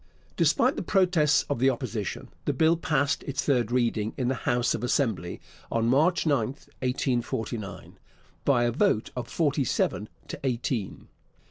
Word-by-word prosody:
Despite -, -, +3 dB
the -, -, -1 dB
protests 175 Hz, -7 st, +3 dB
of 145 Hz, -, -2 dB
the 130 Hz, +2 st, +4 dB
Opposition, 115 Hz, -6 st, -4 dB, 0.2 s
the -, -, +1 dB
Bill 160 Hz, +1 st, +4 dB
passed 150 Hz, -4 st, 0 dB
its 140 Hz, -, -2 dB
third 120 Hz, -5 st, +2 dB
reading 115 Hz, -3 st, 0 dB
in 125 Hz, -2 st, 0 dB
the -, -, +2 dB, 0.2 s
House 120 Hz, 0 st, +2 dB
of 115 Hz, -, -4 dB
Assembly 115 Hz, -, 0 dB, 0.3 s
on 115 Hz, 0 st, +1 dB
March 155 Hz, +10 st, +3 dB
9, 145 Hz, -3 st, +3 dB
1849, 120 Hz, -5 st, -3 dB, 0.4 s
by 130 Hz, -4 st, +3 dB
a 120 Hz, -, +2 dB
vote 130 Hz, -, +1 dB
of 125 Hz, -2 st, -4 dB
forty 145 Hz, -2 st, +1 dB
seven -, -, -1 dB, 0.2 s
to -, -, -6 dB
eighteen. 120 Hz, -5 st, -2 dB
125 Hz, 150 wpm, -27 LUFS, 120-145 Hz, 0.4 s, the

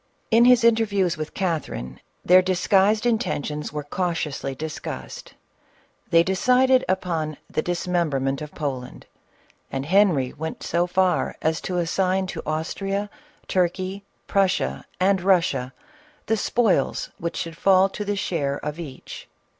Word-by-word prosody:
In 230 Hz, +2 st, +6 dB
his 250 Hz, -1 st, +6 dB
interviews 205 Hz, -6 st, +3 dB
with 155 Hz, -1 st, -6 dB
Catherine, 65 Hz, -, -3 dB, 0.3 s
their 185 Hz, +1 st, +7 dB
disguised 195 Hz, +4 st, +2 dB
in 235 Hz, -2 st, +3 dB
tentions 150 Hz, -, -3 dB
were 150 Hz, 0 st, -4 dB
cautiously 150 Hz, -4 st, -3 dB
discussed. 155 Hz, +3 st, -7 dB, 0.7 s
They 165 Hz, 0 st, +5 dB
decided 255 Hz, +7 st, +3 dB
upon 165 Hz, -5 st, -1 dB
the -, -, -1 dB
dismemberment 160 Hz, -6 st, -1 dB
of 150 Hz, -1 st, -8 dB
Poland, 130 Hz, -4 st, -5 dB, 0.7 s
and 135 Hz, 0 st, -3 dB
Henry 170 Hz, -7 st, +3 dB
went 160 Hz, +2 st, -6 dB
so 170 Hz, +1 st, 0 dB
far 185 Hz, 0 st, +1 dB
as 160 Hz, 0 st, 0 dB
to 180 Hz, -, -3 dB
assign 185 Hz, +2 st, +1 dB
to -, -, -5 dB
Austria, 195 Hz, +6 st, -2 dB, 0.4 s
Turkey, 185 Hz, +2 st, -1 dB, 0.2 s
Prussia 195 Hz, -1 st, 0 dB
and 190 Hz, 0 st, +3 dB
Russia, 175 Hz, -9 st, +2 dB, 0.5 s
the 225 Hz, -, +1 dB
spoils 215 Hz, -, +1 dB
which 170 Hz, 0 st, -3 dB
should 165 Hz, 0 st, -4 dB
foil 190 Hz, +2 st, +4 dB
to 210 Hz, -, -5 dB
the 205 Hz, 0 st, -2 dB
share 145 Hz, -7 st, -1 dB
of 150 Hz, +2 st, -4 dB
each. 140 Hz, -6 st, -9 dB
180 Hz, 130 wpm, -24 LUFS, 155-195 Hz, 0.7 s, their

